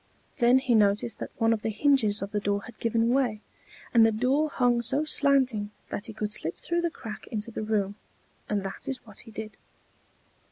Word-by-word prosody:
Then 245 Hz, +1 st, +6 dB
he 260 Hz, -2 st, +1 dB
noticed 210 Hz, +1 st, +2 dB
that -, -, -5 dB
one 225 Hz, 0 st, +3 dB
of 220 Hz, -, -2 dB
the 225 Hz, -, -1 dB
hinges 220 Hz, -3 st, +2 dB
of 200 Hz, -, -6 dB
the 210 Hz, -, 0 dB
door 205 Hz, 0 st, -1 dB
had 235 Hz, -, -12 dB
given 230 Hz, 0 st, +1 dB
way, 245 Hz, -6 st, +1 dB, 0.5 s
and 230 Hz, -2 st, +7 dB
the 225 Hz, -, +5 dB
door 260 Hz, +8 st, +1 dB
hung 245 Hz, -3 st, +2 dB
so 270 Hz, +6 st, +1 dB
slanting 265 Hz, -8 st, +2 dB, 0.2 s
that 215 Hz, -, -4 dB
he 220 Hz, -, -7 dB
could 210 Hz, 0 st, -3 dB
slip 165 Hz, -5 st, +1 dB
through 345 Hz, 0 st, -1 dB
the 340 Hz, -, 0 dB
crack 220 Hz, -9 st, -9 dB
into 215 Hz, +1 st, -4 dB
the -, -, -4 dB
room; 210 Hz, -2 st, 0 dB, 0.6 s
and 205 Hz, -2 st, 0 dB
that 195 Hz, -, -6 dB
is 260 Hz, -2 st, -4 dB
what 215 Hz, -2 st, -8 dB
he 230 Hz, -, -10 dB
did. 215 Hz, 0 st, -8 dB
225 Hz, 205 wpm, -27 LUFS, 210-255 Hz, 0.6 s, and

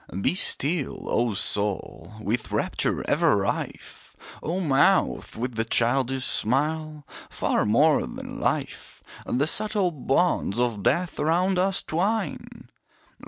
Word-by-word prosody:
Be 100 Hz, -, +1 dB
still, 155 Hz, -4 st, 0 dB
O 120 Hz, -3 st, +1 dB
soul, 100 Hz, -3 st, -3 dB
with 110 Hz, +2 st, -3 dB
rapture -, -, 0 dB
ever -, -, +3 dB
rife! -, -, -4 dB, 0.3 s
O 170 Hz, +4 st, -2 dB
mouth, 165 Hz, -, +2 dB
with 125 Hz, +2 st, -3 dB
the 115 Hz, 0 st, -1 dB
childish 130 Hz, +3 st, +2 dB
smile! 150 Hz, +5 st, 0 dB, 0.2 s
Far -, -, 0 dB
more 145 Hz, +8 st, +4 dB
than -, -, -8 dB
Life, -, -, -3 dB, 0.2 s
The 135 Hz, +4 st, +1 dB
subtle 205 Hz, +1 st, +1 dB
bonds 135 Hz, -, 0 dB
of 120 Hz, -4 st, 0 dB
Death 175 Hz, -, 0 dB
around 180 Hz, +5 st, +1 dB
us 195 Hz, +1 st, +1 dB
twine. 200 Hz, +8 st, -3 dB
145 Hz, 120 wpm, -25 LUFS, 120-175 Hz, 0.3 s, more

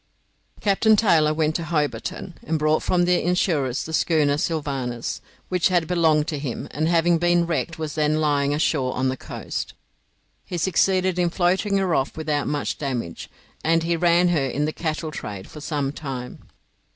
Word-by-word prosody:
Captain 215 Hz, +2 st, +4 dB
Taylor 165 Hz, -8 st, +4 dB
went 155 Hz, 0 st, +1 dB
to 170 Hz, -, -2 dB
Hobarton, 165 Hz, +3 st, -2 dB
and 160 Hz, +1 st, -1 dB
bought 155 Hz, +1 st, +2 dB
from 175 Hz, -1 st, +2 dB
the 180 Hz, 0 st, +2 dB
insurers 160 Hz, -7 st, 0 dB
the 160 Hz, -, -7 dB
schooner 155 Hz, -3 st, +2 dB
'Sylvanus' 140 Hz, -7 st, -3 dB, 0.3 s
which 180 Hz, -2 st, +2 dB
had 175 Hz, -3 st, +2 dB
belonged 160 Hz, -3 st, +2 dB
to 150 Hz, -4 st, -3 dB
him, 135 Hz, -4 st, -4 dB
and 155 Hz, +2 st, -1 dB
having 170 Hz, 0 st, +3 dB
been 175 Hz, 0 st, +3 dB
wrecked 165 Hz, -1 st, -2 dB
was 155 Hz, -2 st, -4 dB
then 155 Hz, 0 st, +1 dB
lying 145 Hz, -2 st, +1 dB
ashore 145 Hz, -3 st, 0 dB
on 130 Hz, +1 st, +1 dB
the 130 Hz, -, -1 dB
coast. -, -, -6 dB, 0.7 s
He 175 Hz, -, -5 dB
succeeded 185 Hz, +1 st, +2 dB
in 175 Hz, -1 st, +2 dB
floating 190 Hz, +3 st, +1 dB
her 190 Hz, -3 st, +1 dB
off 135 Hz, 0 st, 0 dB
without 150 Hz, -2 st, -1 dB
much 145 Hz, -1 st, -2 dB
damage, 125 Hz, -, -4 dB, 0.3 s
and 165 Hz, +1 st, +2 dB
he 170 Hz, +1 st, +1 dB
ran 175 Hz, +1 st, +3 dB
her 150 Hz, -6 st, +1 dB
in 145 Hz, +3 st, -1 dB
the 155 Hz, -, -2 dB
cattle 155 Hz, -1 st, -3 dB
trade 100 Hz, -9 st, -7 dB
for 150 Hz, -, -11 dB
some 145 Hz, -2 st, -2 dB
time. 135 Hz, -4 st, -7 dB
155 Hz, 175 wpm, -23 LUFS, 145-175 Hz, 0.7 s, Captain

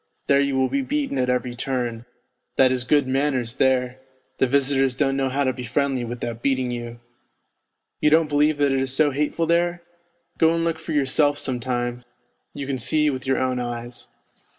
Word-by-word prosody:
There 140 Hz, 0 st, +4 dB
you 140 Hz, -1 st, 0 dB
will 130 Hz, 0 st, +3 dB
be 280 Hz, -, -1 dB
beaten 280 Hz, -, -2 dB
at 125 Hz, 0 st, +1 dB
every 125 Hz, -1 st, -1 dB
turn; 120 Hz, -2 st, -3 dB, 0.5 s
that 130 Hz, -1 st, +4 dB
is 125 Hz, -1 st, -2 dB
good 145 Hz, +1 st, +3 dB
manners 130 Hz, -3 st, 0 dB
there, 130 Hz, -1 st, +1 dB, 0.4 s
the 135 Hz, -, +3 dB
visitors 135 Hz, -1 st, +1 dB
don't 135 Hz, 0 st, +1 dB
know 135 Hz, -1 st, 0 dB
how 140 Hz, +2 st, 0 dB
to 130 Hz, -1 st, +1 dB
be 125 Hz, -, -7 dB
friendly 135 Hz, +1 st, -1 dB
without 120 Hz, -1 st, -5 dB
beating 130 Hz, -2 st, 0 dB
you. 120 Hz, -1 st, -6 dB, 1.0 s
You 150 Hz, -, +3 dB
don't 160 Hz, +1 st, +4 dB
believe 150 Hz, +1 st, +2 dB
that 145 Hz, -1 st, +2 dB
it 135 Hz, -, +1 dB
is 135 Hz, 0 st, -1 dB
so 150 Hz, 0 st, +3 dB
hateful 150 Hz, +4 st, -1 dB
there? 170 Hz, +1 st, +1 dB, 0.6 s
Go 165 Hz, 0 st, +4 dB
and 165 Hz, -, 0 dB
look 165 Hz, -1 st, -1 dB
for 160 Hz, 0 st, -5 dB
yourself 145 Hz, +1 st, +2 dB
some 130 Hz, -3 st, -2 dB
time, 120 Hz, 0 st, -3 dB, 0.5 s
you 140 Hz, -, -5 dB
can 135 Hz, -1 st, -3 dB
see 150 Hz, +5 st, +2 dB
with 130 Hz, -1 st, -6 dB
your 135 Hz, -, +2 dB
own 130 Hz, -1 st, 0 dB
eyes. 120 Hz, 0 st, -6 dB
135 Hz, 195 wpm, -23 LUFS, 125-145 Hz, 1.0 s, There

